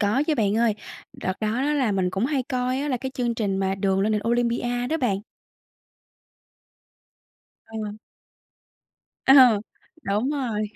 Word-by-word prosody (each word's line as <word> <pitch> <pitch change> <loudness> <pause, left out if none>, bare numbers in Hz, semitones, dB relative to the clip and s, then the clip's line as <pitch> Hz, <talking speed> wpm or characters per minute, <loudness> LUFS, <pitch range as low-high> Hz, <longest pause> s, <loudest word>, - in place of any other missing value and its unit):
có 215 +6 +2
chứ, 315 - +2
bạn 210 -5 +1
ơi. 230 -2 +2 0.4
Đợt 185 - -3
đó 215 - 0
đó 290 +2 +1
là 260 -7 +1
mình 185 -2 0
cũng 195 +6 0
hay 275 -2 0
coi 255 0 -1
á, 290 - -2
là 260 - 0
cái 265 +2 -5
chương 240 -2 -1
trình 205 -4 -1
mà 190 0 0
"Đường 195 0 0
lên 210 +2 +1
đỉnh 210 - +1
Olympia" 240 +1 0
đó 320 - 0
bạn. 230 -10 0 2.5
Ờ. 215 -2 -6 1.3
Ờ, 270 - +8 0.7
đúng 210 +7 0
rồi, 250 -8 -2
235 Hz, 155 wpm, -24 LUFS, 205-255 Hz, 2.5 s, Ờ